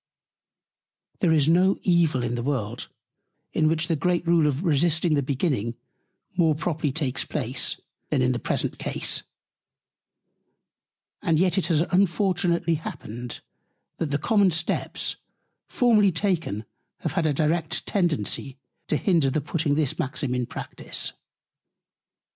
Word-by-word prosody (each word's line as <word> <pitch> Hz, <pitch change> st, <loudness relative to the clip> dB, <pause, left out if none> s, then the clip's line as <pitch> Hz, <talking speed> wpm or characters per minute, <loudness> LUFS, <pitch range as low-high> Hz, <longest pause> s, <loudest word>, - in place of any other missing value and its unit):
There 175 Hz, -, +3 dB
is 150 Hz, -3 st, +4 dB
no 185 Hz, +4 st, +4 dB
Evil 165 Hz, -8 st, +3 dB
in 120 Hz, 0 st, -1 dB
the 120 Hz, -, -2 dB
World, 120 Hz, -4 st, -3 dB, 0.6 s
in 155 Hz, -, +3 dB
which 165 Hz, +1 st, +1 dB
the 165 Hz, -, +1 dB
great 175 Hz, +3 st, 0 dB
Rule 165 Hz, -2 st, +4 dB
of 145 Hz, +3 st, -1 dB
Resisting 165 Hz, 0 st, +2 dB
the 145 Hz, -, +3 dB
Beginning, 130 Hz, -, -1 dB, 0.6 s
more 165 Hz, -4 st, +3 dB
properly 155 Hz, -2 st, -1 dB
takes 135 Hz, -3 st, -1 dB
Place, -, -, -1 dB, 0.3 s
than 135 Hz, -4 st, +2 dB
in 125 Hz, -, +3 dB
the 125 Hz, -, -1 dB
present -, -, -2 dB
Case; -, -, -1 dB, 2.0 s
and 160 Hz, -2 st, +2 dB
yet 185 Hz, 0 st, +3 dB
it 175 Hz, -, 0 dB
has 160 Hz, -3 st, +3 dB
unfortunately 180 Hz, -2 st, +2 dB
happened, 120 Hz, -4 st, -7 dB, 0.6 s
that 160 Hz, -, -1 dB
the 145 Hz, -, +1 dB
common 200 Hz, +5 st, +3 dB
Steps 165 Hz, -1 st, -1 dB, 0.5 s
formerly 215 Hz, -5 st, +4 dB
taken 165 Hz, -, -1 dB, 0.4 s
have -, -, -2 dB
had 165 Hz, -, +1 dB
a -, -, +2 dB
direct 155 Hz, +2 st, 0 dB
Tendency 150 Hz, -, 0 dB, 0.3 s
to 150 Hz, -, +1 dB
hinder 165 Hz, -7 st, +2 dB
the 140 Hz, -, 0 dB
putting 150 Hz, 0 st, 0 dB
this 150 Hz, 0 st, 0 dB
Maxim 140 Hz, -3 st, -2 dB
in 125 Hz, -1 st, -1 dB
Practice. -, -, -4 dB
160 Hz, 135 wpm, -25 LUFS, 140-175 Hz, 2.0 s, is